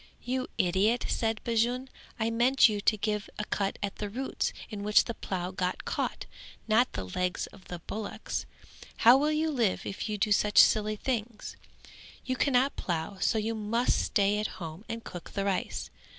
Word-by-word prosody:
"You 255 +1 -2
idiot," 195 +7 +2
said 225 -1 0
Bajun, 240 +3 +1 0.3
"I 225 +1 +1
meant 245 +4 +5
you 210 -2 -2
to 215 +1 +3
give 210 0 -2
a 210 - -2
cut 195 -2 -1
at 200 0 -3
the 210 - -4
roots 260 +6 -2 0.2
in 210 -1 -5
which 210 +1 +5
the 235 - -3
plough 185 -4 -4
got 185 -1 -2
caught, - - -2 0.4
not 225 +3 +4
at - - -34
the 95 - -3
legs 180 - -2
of 185 - -16
the 175 - -6
bullocks; 210 -1 -4 0.6
how 240 +2 +10
will 300 +2 +2
you 310 +1 +1
live 235 -9 0
if 200 - -4
you 210 - -2
do 210 +1 0
such 205 0 +2
silly 215 0 +6
things? 230 -1 -3 0.7
You 255 - -1
cannot 265 0 +2
plough, 175 +3 -3 0.2
you 220 +1 0
must 225 +3 +1
stay 205 0 +2
at 215 - 0
home 165 +4 -7
and 230 0 -4
cook 175 - -9
the 200 -1 -1
rice. 195 -2 -2
215 Hz, 180 wpm, -29 LUFS, 195-235 Hz, 0.7 s, how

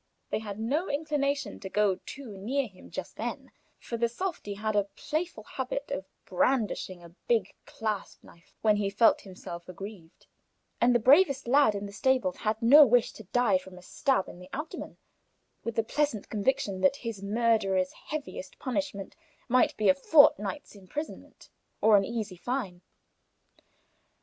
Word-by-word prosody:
They - - 0
had 205 -2 -6
no 285 +11 -1
inclination 285 -1 -1
to 190 - -7
go 205 -2 +2
too 260 -7 -8
near 255 +8 -1
him 195 -5 -14
just - - -7
then, - - -5 0.3
for 235 - -5
the 235 0 +1
softy 270 - -4
had 215 +1 -2
a 205 -1 +3
playful 310 -6 -3
habit 265 +4 -4
of 190 - -3 0.2
brandishing 190 -4 0
a 170 0 -14
big 225 -5 +1
clasp 215 -3 -4
knife 170 +1 -19
when 215 -1 +4
he 200 -1 0
felt 215 +3 +4
himself 180 -2 -9
aggrieved, 180 -2 -10 0.6
and 245 +1 +5
the - - +5
bravest 275 +3 +5
lad 270 -4 +5
in 200 0 -4
the 200 - -7
stables 255 -5 +1
had 220 +1 -2
no 285 +6 +9
wish 245 -3 +3
to 220 - -12
die 210 -2 +2
from 185 0 -13
a 180 - -13
stab 265 -1 0
in 175 - -11
the 180 0 -12
abdomen, 300 +3 -6 0.7
with 230 0 -4
the 225 - +2
pleasant 285 -3 -1
conviction 210 -3 0
that 280 -1 +4
his 225 -4 -4
murderer's 200 -3 +1 0.2
heaviest 310 - -6
punishment 255 -7 -3 0.3
might 250 +1 +3
be 215 - +1
a - - +7
fortnight's 280 -4 +4
imprisonment 205 - -8 0.3
or 220 -1 +6
an 200 - +5
easy 215 -5 -4
fine. 195 -4 -3
220 Hz, 160 wpm, -29 LUFS, 195-270 Hz, 0.7 s, no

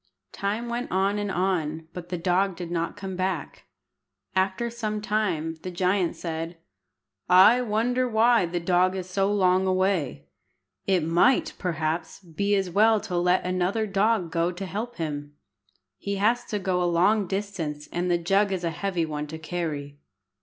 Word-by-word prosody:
Time 210 +4 -2
went 240 +1 -3
on 195 +2 +1
and 205 -1 -2
on, 165 -4 -1
but 175 -1 -8
the 180 - -2
dog 185 +2 +1
did 175 -1 -7
not 170 +2 -2
come 195 -2 -5
back. 185 -4 -3 0.7
After 190 +5 +1
some 215 -2 -3
time 195 -7 -1
the 185 - -5
giant 180 0 0
said 165 0 -5 0.7
"I 190 +7 +7
wonder 245 +3 0
why 225 -3 +4
the 175 +1 -2
dog 180 +2 +2
is 185 -1 -4
so 195 +2 0
long 190 -2 +3
away. 185 -6 0 0.6
It 185 -4 +2
might, 255 - +3
perhaps, 160 -2 -2
be 200 +3 -1
as 195 -1 0
well 220 +3 +4
to 205 -4 -5
let 180 +1 +2
another 185 +4 0
dog 200 -3 +1
go 170 +1 +1
to 185 +2 -6
help 220 +6 -5
him. 145 -3 -5 0.6
He 200 0 -3
has 230 +5 +1
to 210 - -3
go 185 -2 0
a - - +2
long 185 +4 +3
distance, 175 -7 -4
and 175 +1 -1
the 175 - +3
jug 195 +4 +2
is 185 -2 -2
a 170 - 0
heavy 175 +1 -1
one 150 -1 -4
to 160 +2 -7
carry." 155 -4 -4
185 Hz, 165 wpm, -26 LUFS, 170-205 Hz, 0.7 s, I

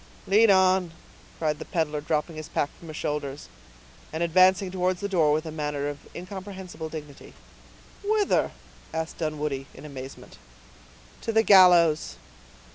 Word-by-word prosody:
"Lead 215 +3 +5
on," 190 -2 +4 0.4
cried 150 -2 -1
the - - -7
peddler, 150 -3 -1
dropping 155 +2 -1
his 155 -1 -7
pack 145 - -1
from 170 - -13
his 155 - -7
shoulders, 145 - -4 0.6
and 160 +2 -2
advancing 185 +2 +4
towards 185 0 0
the 200 - -2
door 165 -6 +3
with 155 +2 0
a 160 - -5
manner 150 -2 -3
of 145 0 -5 0.2
incomprehensible 185 -3 -7
dignity. 150 -3 -10 0.7
"Whither?" 415 0 +2 0.5
asked 160 0 -4
Dunwoodie, 150 -4 -3
in - - -11
amazement. 135 - -10 0.8
"To 230 - -2
the 225 0 +4
gallows." 175 - +6
160 Hz, 140 wpm, -26 LUFS, 150-185 Hz, 0.8 s, gallows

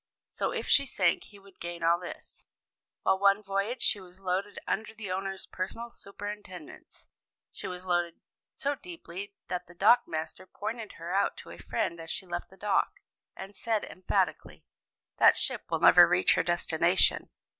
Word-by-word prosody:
So - - -2
if - - -3
she 280 -1 +4
sank 180 -7 +1
he 205 - -15
would 195 -1 -19
gain 170 0 -6
all 170 +1 +4
this. 180 - -10 0.6
Well, 190 - +3
one 200 +1 +4
voyage 200 +5 -1
she 205 - +2
was 185 0 -14
loaded 190 +2 -2
under 220 +1 -2
the 210 -4 -6
owner's 195 +1 -3
personal 230 +6 -5
superintendence; 200 -5 -9 0.5
she - - -6
was 180 0 -6
loaded 175 -2 0 0.4
so 285 0 -1
deeply 205 - -8
that 180 0 -4
the 175 - -15
dockmaster 175 -6 +2
pointed 220 +1 -5
her 170 +2 -6
out 200 +1 +1
to - - -10
a - - -11
friend 170 0 -2
as 165 0 -7
she 190 - +1
left 175 -1 -5
the 190 - -17
dock, 205 +1 +1 0.4
and 195 +1 -9
said 220 -1 -1
emphatically, 185 - -2 0.5
'That - - +7
ship - - +1
will - - -1
never - - +9
reach - - +4
her - - +2
destination. - - +2
195 Hz, 165 wpm, -29 LUFS, 180-210 Hz, 0.6 s, never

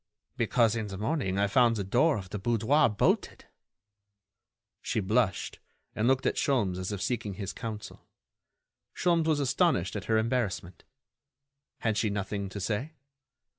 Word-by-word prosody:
"Because, 115 -2 +2
in 110 -2 -2
the 95 -1 -6
morning 110 - -1
I 100 - +3
found 115 +3 +3
the 100 - -2
door 130 - +2
of 95 -3 -8
the 105 - -4
boudoir 120 +8 +3
bolted." 105 - 0 1.4
She - - -1
blushed, 105 0 0 0.4
and 110 +2 +1
looked 130 0 +2
at - - +1
Sholmes 105 - +1
as 95 +2 -3
if 100 -2 -3
seeking 110 -5 -2
his 100 0 -5
counsel. 110 -2 -7 0.9
Sholmes 170 -2 +2
was 155 -2 +2
astonished 135 - +1
at 100 - -4
her 110 - +2
embarrassment. 110 -6 -2 1.0
Had 110 -2 0
she 110 - +1
nothing 100 0 -3
to 100 - -6
say? 115 - -2
110 Hz, 150 wpm, -29 LUFS, 100-125 Hz, 1.4 s, I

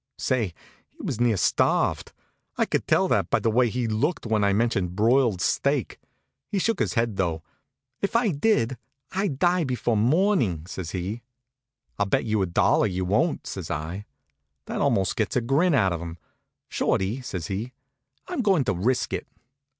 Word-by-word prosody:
Say, 110 -10 -1 0.3
he - - -38
was 115 - -3
near 120 -4 +3
starved. - - +1 0.5
I - - +3
could - - -2
tell - - +3
that - - +1
by - - +3
the 115 - 0
way 120 +1 +3
he 120 +1 -2
looked 120 +11 -1
when 110 -2 +1
I 100 - +3
mentioned 100 -4 0
broiled 115 -2 +3
steak. 140 +3 0 0.5
He 205 - -2
shook 220 +2 0
his - - 0
head, 115 -4 0
though. 80 -3 -1 0.6
"If 200 +3 -2
I 230 -2 +3
did, 140 - +1 0.3
I'd 190 -7 -1
die 175 +3 +2
before 125 -4 -1
morning," 125 - +2
says 90 -2 -6
he. 95 +6 -4 0.8
"I'll 100 - +2
bet 100 - +1
you 110 -2 +1
a 95 - +1
dollar 85 +5 +3
you 95 -1 -2
wouldn't," 125 - +1
says 95 -5 -6
I. 80 +7 -4 0.6
That - - -3
almost 95 -1 +1
gets 110 -4 -1
a - - +4
grin 140 +8 +2
out 95 -8 +3
of 85 - -4
him. 85 0 -7 0.5
"Shorty," 105 +8 0
says 90 -9 -5
he, 105 +7 -4 0.6
"I'm - - -2
going 195 - +3
to 100 - 0
risk 120 +8 0
it." - - -3
115 Hz, 175 wpm, -25 LUFS, 95-135 Hz, 0.8 s, a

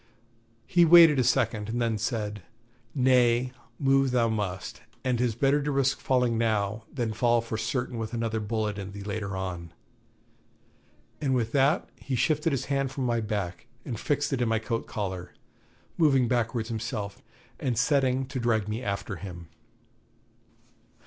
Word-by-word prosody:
He 175 -1 +4
waited 165 -3 +8
a - - +4
second, 110 -2 +1
and 120 +2 -2
then 115 -2 0
said: 105 -2 -2 0.5
'Nay, 125 -2 +3 0.3
move 135 -1 +3
thou 120 -2 +2
must, 100 -4 -3 0.2
and 125 -2 0
'tis 120 -3 +1
better 140 +4 +2
to 145 +1 -1
risk 135 -1 +1
falling 125 -3 +1
now, 110 -1 0
than 120 -5 -2
fall 120 +1 +3
for 115 -1 -4
certain 120 +2 -2
with 110 -1 -4
another 115 -1 -1
bullet 105 -1 -2
in 100 0 -7
thee 100 0 -7
later 100 -1 -4
on.' 90 -3 -5 1.5
And 135 -3 +1
with 115 -2 0
that 140 +4 +2
he 135 - -4
shifted 155 +5 +1
his 135 - -1
hand 135 -1 0
from 135 -1 -3
my 120 -1 +1
back 105 -1 -4 0.2
and 115 -5 -4
fixed 145 0 0
it 130 - 0
in 120 - +1
my 115 - +2
coat 115 +1 -3
collar, 95 -4 -5 0.6
moving 135 -6 +4
backwards 115 -1 -1
himself, 110 -3 -4 0.4
and 125 -4 -1
setting 130 0 +2
to 135 - -3
drag 110 -4 +1
me 110 +3 -3
after 100 -3 -3
him. 85 -3 -9
115 Hz, 160 wpm, -27 LUFS, 105-130 Hz, 1.5 s, waited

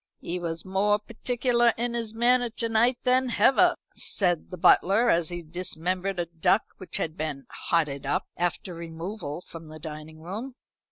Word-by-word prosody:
"He 180 +2 -4
was 165 -1 -4
more 200 +2 +2
particular 240 +2 +1
in 240 +1 -1
his 230 -2 -2
manner 245 +2 +3
to 230 0 -3
night 235 +3 +3
than 255 0 +3
hever," 350 +9 +4 0.2
said 175 -5 +1
the 180 - -7
butler, 200 +7 +5
as 170 -1 +2
he 175 -1 -5
dismembered 180 +3 -2
a 175 - 0
duck 175 +5 +2 0.2
which 185 - -4
had 160 -1 -2
been 155 -4 -4 0.2
"hotted 150 -5 +1
up" - - 0
after 175 +1 -2
removal 170 0 -6
from 165 -2 -11
the 155 0 -10
dining 155 0 -9
room. 215 +10 -6
185 Hz, 165 wpm, -27 LUFS, 165-230 Hz, 0.2 s, butler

